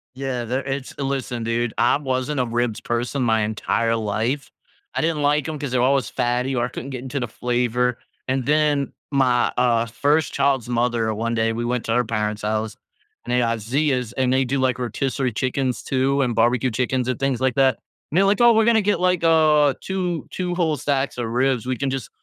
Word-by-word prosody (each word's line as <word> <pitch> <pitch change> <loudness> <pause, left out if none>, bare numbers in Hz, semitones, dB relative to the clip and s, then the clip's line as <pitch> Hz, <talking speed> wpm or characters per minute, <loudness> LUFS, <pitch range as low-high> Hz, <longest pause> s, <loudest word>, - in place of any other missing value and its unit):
Yeah, 130 -2 -3
there 130 +4 -2
it's 135 0 -5
listen, 135 -4 -3
dude, 115 0 -1
I 120 +3 +3
wasn't 130 0 -2
a 125 - +2
ribs 120 -1 -1
person 120 +3 -2
my 110 -2 +2
entire 115 +2 0
life. 115 +5 -2 0.5
I - - +1
didn't 160 -2 0
like 145 -1 +2
'em 155 -2 -4
'cause 140 -3 -4
they're 125 -1 +1
always 130 -1 +2
fatty 125 +1 -1
or 120 -1 +1
I - - -2
couldn't 125 - -7
get 130 -2 -6
into 135 +2 -3
the 125 - -2
flavor, 125 +1 0 0.3
and 130 -1 -1
then 150 -2 +1 0.2
my, 125 -3 +2
uh, 120 -2 +3
first 145 +6 +1
child's 135 -4 +1
mother, 120 -2 0
one 115 +2 -2
day, 115 0 +1
we 115 +1 -3
went 120 0 -2
to 115 - 0
her 125 +1 +3
parents' 105 -2 -2
house, 110 +1 -2 0.5
and 120 - -4
they 125 - +3
had 115 -2 0
Zea's, 125 0 0
and 130 -1 +1
they 135 +1 +3
do, 135 +2 -1
like, 130 -1 +1
rotisserie 130 +2 -1
chickens 130 +1 -2
too 135 +1 +1
and 120 -4 0
barbecue 120 +2 +2
chickens 125 +2 -1
and 130 - -2
things 135 -2 0
like 130 -2 +1
that, 135 -3 +3 0.3
and 165 - 0
they're 195 - +5
like, 205 +4 +2
"Oh, 240 0 +7
we're 220 0 +3
gonna 225 -1 +4
get, 205 -3 +1
like, 180 -2 +1
uh, 155 -3 +4
2- 180 -3 -3
2 180 -1 -3
whole 160 -4 +1
stacks 140 -1 -1
of 120 - -2
ribs, 125 0 0
we 130 -1 -2
can 140 +2 -1
just 130 -4 -4
130 Hz, 215 wpm, -22 LUFS, 120-140 Hz, 0.5 s, Oh